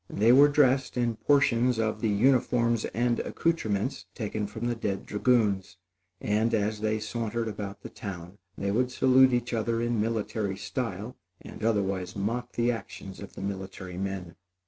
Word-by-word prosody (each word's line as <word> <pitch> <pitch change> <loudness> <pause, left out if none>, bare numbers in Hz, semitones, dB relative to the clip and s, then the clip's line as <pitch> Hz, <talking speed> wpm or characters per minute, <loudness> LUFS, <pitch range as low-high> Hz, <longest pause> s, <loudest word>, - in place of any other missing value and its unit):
They 110 +4 +3
were 140 +3 +8
dressed 135 -3 +2
in 120 -2 0
portions 125 -4 +3
of 110 -1 -1
the 110 - +1
uniforms 120 0 +2
and 120 +1 0
accoutrements 130 -8 -1
taken 105 -2 -3
from 110 +3 -6
the 120 - +1
dead 105 -4 -3
dragoons; 105 -5 +1 0.4
and, 110 +2 +1
as 105 0 -1
they 110 0 +1
sauntered 115 +1 -3
about 100 -2 -6
the - - -7
town, 90 0 -8 0.2
they 100 0 -1
would 125 +4 +1
salute 130 0 +5
each 120 0 -1
other 115 0 0
in 120 -2 0
military 110 -3 -2
style, - - -4 0.2
and - - -10
otherwise 95 -4 0
mock 120 +5 -2
the 120 +1 +2
actions 100 -4 -7
of 100 - -9
the - - -7
military 95 -2 -5
men. 95 -3 -4
110 Hz, 160 wpm, -28 LUFS, 100-120 Hz, 0.4 s, were